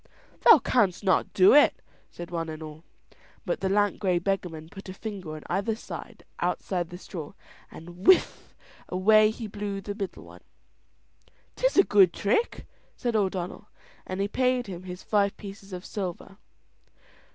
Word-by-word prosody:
"Thou - - +9
canst 205 -7 +1
not 190 -2 +2
do 190 0 +6
it," 295 +1 +5 0.3
said 175 0 -9
one 165 -1 -3
and 155 0 -7
all. 155 +1 -10 0.6
But - - -1
the 190 - -1
lank 205 +1 +1
grey 185 -3 +1
beggarman 175 -4 -3
put 195 +2 -11
a 185 - -7
finger 190 -7 -6
on 155 - -9
either 200 +5 -1 0.6
outside 175 -2 -2
straw 160 -5 -8 0.4
and, 175 +3 -11
whiff, 375 - +3 0.3
away 215 +4 +5
he 225 +1 -6
blew 205 -1 -4
the 205 +1 -5
middle 200 -3 -6
one. - - -14 1.1
"'Tis - - +1
a 390 - +8
good 195 - +5
trick," 230 - 0 0.3
said 240 -2 -2
O'Donnell; 190 -3 -2 0.4
and 185 +1 -4
he 200 - +1
paid 255 +2 +1
him 185 -3 -8
his 180 +1 -8
five 200 -2 +1
pieces 200 0 -10
of 180 0 -7
silver. 195 -1 -6
195 Hz, 150 wpm, -27 LUFS, 180-210 Hz, 1.1 s, Thou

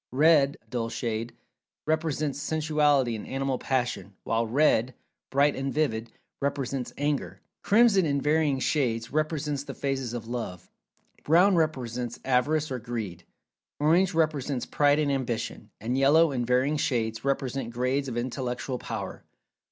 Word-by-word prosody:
Red 145 0 +4
(dull 115 0 -2
shade) 115 0 -3 0.5
represents 155 -2 -1
Sensuality 150 -5 +2
and 110 - -7
Animal 135 -1 -2
Passion, 125 -6 -2
while 115 0 0
red 125 -1 +2 0.3
(bright 140 +1 +3
and 135 0 -2
vivid) 115 -7 -1 0.3
represents 135 -2 -2
Anger. 145 0 -2 0.2
Crimson, 210 -2 +5
in 140 -3 +1
varying 150 -1 +2
shades, 120 -5 0
represents 150 -1 -1
the - - -8
phases 135 -4 -2
of 115 -2 -6
"Love." 115 -7 -5 0.5
Brown 180 +6 +5
represents 125 -7 -1
Avarice 140 +4 +1
or 130 - -2
Greed. 110 -8 -5 0.5
Orange 170 +5 +3
represents 145 -5 0
Pride 145 0 +3
and 150 -2 +1
Ambition; 120 -4 -3
and 120 +4 -2
Yellow, 145 +4 +5
in 125 -3 -1
varying 130 +5 +2
shades, 115 -5 -1
represents 135 -3 -1
grades 130 +3 0
of 120 -2 -4
Intellectual 125 +1 -3
Power. 110 -5 -6
135 Hz, 135 wpm, -27 LUFS, 120-150 Hz, 0.5 s, Crimson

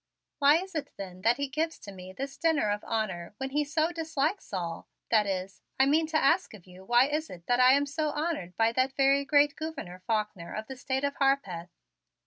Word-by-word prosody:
"Why 285 +1 +6
is 380 +2 -6
it 310 -3 -3
then 185 -2 -8
that 230 +4 +3
he 285 0 -1
gives 315 +4 -2
to 200 - -10
me 185 -1 -10
this 275 +7 -6
dinner 305 -10 +1
of 205 0 -2
honor 205 -5 -3
when 265 +1 -4
he 295 +2 +1
so 310 +3 0
dislikes 325 +2 -2
all 170 -4 -4 0.2
that 215 -3 +4
is, 190 0 -4 0.2
I 265 - +6
mean 310 +3 +3
to 315 0 +1
ask 325 - +2
of 190 - -16
you 185 0 -14
why 240 +5 +4
is 305 +3 -2
it 175 -2 -11
that 245 0 +2
I 255 +1 +7
am 285 +1 +3
so 305 +2 -1
honored 295 - -3
by 225 0 +3
that 260 +2 +1
very 275 0 +3
great 290 0 +3
Gouverneur 310 - -6
Faulkner 210 -6 -2
of 215 - -4
the 265 - -8
State 265 +1 -2
of 280 0 -1
Harpeth?" 200 -12 0
265 Hz, 220 wpm, -29 LUFS, 200-295 Hz, 0.2 s, I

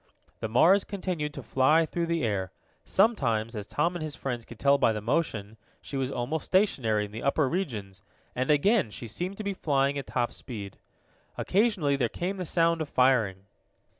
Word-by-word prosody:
The - - -2
Mars 175 - +5
continued 180 -7 -3
to 140 - -7
fly 150 +8 +3
through 170 +1 -2
the 170 -3 0
air. 100 -5 -1 0.3
Sometimes, 120 - +1
as 105 -1 -5
Tom 170 +10 0
and 175 - -4
his 155 -2 -4
friends 120 -2 -4
could 120 - -12
tell 140 +3 +3
by 115 - +3
the 105 - -3
motion, 110 -3 -2 0.2
she - - -8
was 135 -1 -1
almost 135 +5 -3
stationary 125 - +2
in 100 - -11
the 110 - -6
upper 140 +1 +2
regions, 110 - -4 0.3
and 130 +1 -1
again 175 - +3
she 110 - -8
seemed 180 - -4
to 215 - -5
be 200 -1 -2
flying 140 -5 +1
at 135 - -8
top 120 -2 -1
speed. 100 -6 -8 0.6
Occasionally 190 -9 +1
there 120 -4 +1
came 185 - -3
the 180 - -4
sound 165 0 +2
of 155 - -3
firing. 115 -7 +2
140 Hz, 190 wpm, -28 LUFS, 115-170 Hz, 0.6 s, Mars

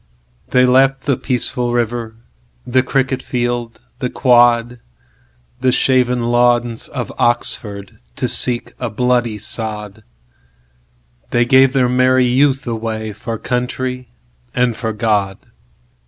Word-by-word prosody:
They 125 0 +4
left 135 +1 +3
the 140 -1 0
peaceful 125 -1 -2
river, 120 -1 -2 0.5
The 130 +1 +2
cricket 130 0 -1
field, 120 -2 -3 0.2
the - - -2
quad, 120 -1 +3 0.8
The 130 - +2
shaven 125 -1 +2
lawns 120 -1 +1
of 120 -6 -5
Oxford, 105 -4 -1 0.2
To - - -2
seek 120 -2 0
a 120 - -3
bloody 120 -1 0
sod—They - - -6
gave 130 +1 +5
their 130 -2 +2
merry 130 +1 +3
youth 135 +2 +2
awayFor 110 -1 -5
country 125 0 -3 0.5
and 125 -2 +1
for 110 0 -3
God. 105 -3 0
120 Hz, 110 wpm, -17 LUFS, 110-125 Hz, 0.8 s, gave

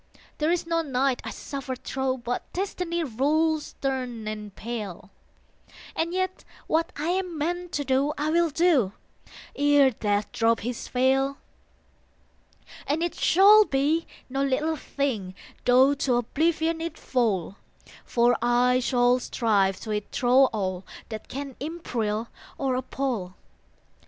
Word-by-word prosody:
There 305 +1 +1
is 345 0 +1
no 330 0 +1
night 270 -3 0
I - - -5
suffer 275 -2 -5
thro 265 +1 -2
But 245 0 -4
Destiny 355 -3 -2
rules 305 +4 +1
stern 250 -5 -4
and 210 -2 -6
pale: 210 -5 -6 0.8
And 330 +1 -1
yet 370 +1 -2 0.2
what 325 +1 0
I 300 +4 -2
am 365 -2 -1
meant 350 +3 -2
to 290 - -1
do 270 +3 +2
I 300 +1 0
will 340 0 +3
do, 295 - +2 0.6
ere 285 -2 +5
Death 205 -2 -1
drop 230 0 +2
his 240 +1 -4
veil. 270 +2 +2 1.5
And 305 +4 0
it 345 - -1
shall 410 +4 +6
be 295 +3 +1 0.2
no 270 +1 -1
little 300 +4 0
thing, 230 -12 -3 0.3
Tho 255 +3 +6
to 270 -3 0
oblivion 320 +6 0
it 335 0 -4
fall, 205 -7 -1 0.5
For 240 0 +3
I 245 +1 +3
shall 245 0 +3
strive 200 -6 +1
to 220 - -5
it 210 -1 -3
thro 255 +2 +5
all 190 -6 -2 0.3
That 220 -1 -7
can 275 -1 -6
imperil 235 -8 -3 0.3
or 270 -2 0
appal. 250 -7 -3
265 Hz, 135 wpm, -26 LUFS, 235-315 Hz, 1.5 s, shall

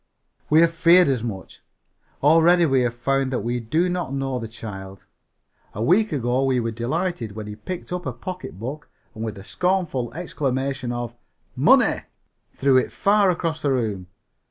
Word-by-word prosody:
We 155 +2 +6
have 165 0 +4
feared 170 +1 +5
as 125 -4 0
much. 100 -5 -7 0.6
Already 165 +3 +5
we 135 -4 +3
have 120 -1 -1
found 135 +2 0
that 125 - -1
we 120 +1 -1
do 155 +10 0
not 180 -5 -2
know 135 -2 -2
the 115 - -5
child. 95 -4 -9 0.7
A 105 - -2
week 205 - +3
ago 130 -2 0
we 130 -2 +2
were 115 -1 -2
delighted 120 - -2
when 110 0 -6
he 105 0 -7
picked 175 - -6
up 180 -4 -4
a - - -1
pocketbook 140 - -7 0.2
and, 110 - -6
with 110 -2 -4
a 95 - -9
scornful 170 - -1
exclamation 135 -6 -2
of 120 -1 -4 0.4
"Money!" - - +4 0.5
threw 135 -1 +3
it 130 - +1
far 200 -1 +3
across 165 -3 -1
the 140 - +1
room. 105 -7 -2
130 Hz, 170 wpm, -23 LUFS, 115-165 Hz, 0.7 s, We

